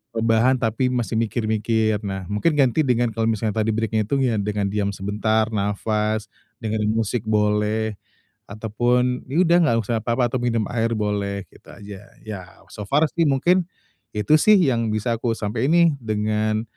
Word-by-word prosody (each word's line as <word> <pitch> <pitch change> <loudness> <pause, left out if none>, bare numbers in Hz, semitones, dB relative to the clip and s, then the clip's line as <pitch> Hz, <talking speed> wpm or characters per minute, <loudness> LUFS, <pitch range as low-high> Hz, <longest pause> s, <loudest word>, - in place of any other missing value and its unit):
rebahan, 115 +3 +3
tapi 125 +1 0
masih 120 -3 -1
mikir-mikir. 110 -1 0
Nah, 95 -2 -5
mungkin 150 +10 +1
ganti 135 0 +2
dengan 120 -1 +1
kalau 115 0 -1
misalnya 110 -1 -1
tadi 110 0 0
break-nya 110 -1 -1
itu 140 - 0
ya 115 -5 +1
dengan 105 0 -2
diam 100 -1 -1
sebentar, 110 +3 0
nafas, 105 +1 -1 0.3
dengerin 110 0 -1
musik 115 0 -2
boleh 105 0 0 0.5
ataupun, 120 +4 0
ya 140 +5 -3
udah, 170 0 +4
nggak 115 - +2
usah 115 +2 -1
apa-apa, 115 +2 0
atau 130 - -1
minum 120 -2 0
air 115 -1 0
boleh 100 -2 -2
gitu - - -21
aja, 100 -1 -11 0.2
ya 95 -4 -9
so 105 - -7
far 145 +6 +3
sih, 165 - +1
mungkin, 175 +6 +2 0.5
itu 105 +8 +3
sih, 215 +6 +6
yang 120 -9 +1
bisa 110 +2 -1
aku 115 -1 -1
sampein 110 +4 -2
nih 170 0 +5
dengan 110 -1 -1
110 Hz, 165 wpm, -22 LUFS, 105-120 Hz, 0.5 s, sih